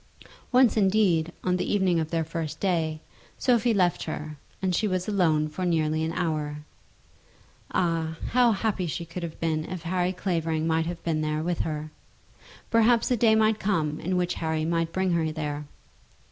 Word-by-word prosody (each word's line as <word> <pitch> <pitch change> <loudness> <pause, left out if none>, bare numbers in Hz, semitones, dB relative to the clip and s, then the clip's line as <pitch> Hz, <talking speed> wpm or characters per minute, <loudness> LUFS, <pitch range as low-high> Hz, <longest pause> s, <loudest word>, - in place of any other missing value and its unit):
Once 255 -1 +5
indeed, 190 -5 +3
on 180 0 +1
the 180 - -2
evening 190 -4 +2
of 160 -1 -2
their 165 -1 0
first 160 -1 -5
day, 165 -5 0 0.4
Sophie 240 -2 +3
left 185 -5 +1
her, 155 -1 -5 0.2
and 190 -1 0
she 215 - +1
was 185 -2 -1
alone 165 -7 +2
for 155 +5 -5
nearly 160 -2 +1
an 160 - -1
hour. 150 -3 -2 1.1
Ah, 165 -2 0
how 245 -1 +5
happy 205 -3 -1
could - - -4
she 170 - -4 0.2
have 170 -2 -6
been 160 -1 0
if 185 -3 -6
Harry 180 +1 0
Clavering 165 -4 -1
might 160 0 +1
have 175 0 -5
been 160 -2 0
there 155 0 -1
with 175 0 -1
her. 155 -1 -3 0.8
Perhaps 230 +1 +4
a - - +4
day 220 -1 +4
might 220 0 +3
come 160 -7 0
in 185 +2 -1
which 180 -1 0
Harry 160 -1 0
might 165 0 0
bring 190 0 0
her 165 -2 +1
there. 150 -1 -4
170 Hz, 175 wpm, -26 LUFS, 155-190 Hz, 1.1 s, Once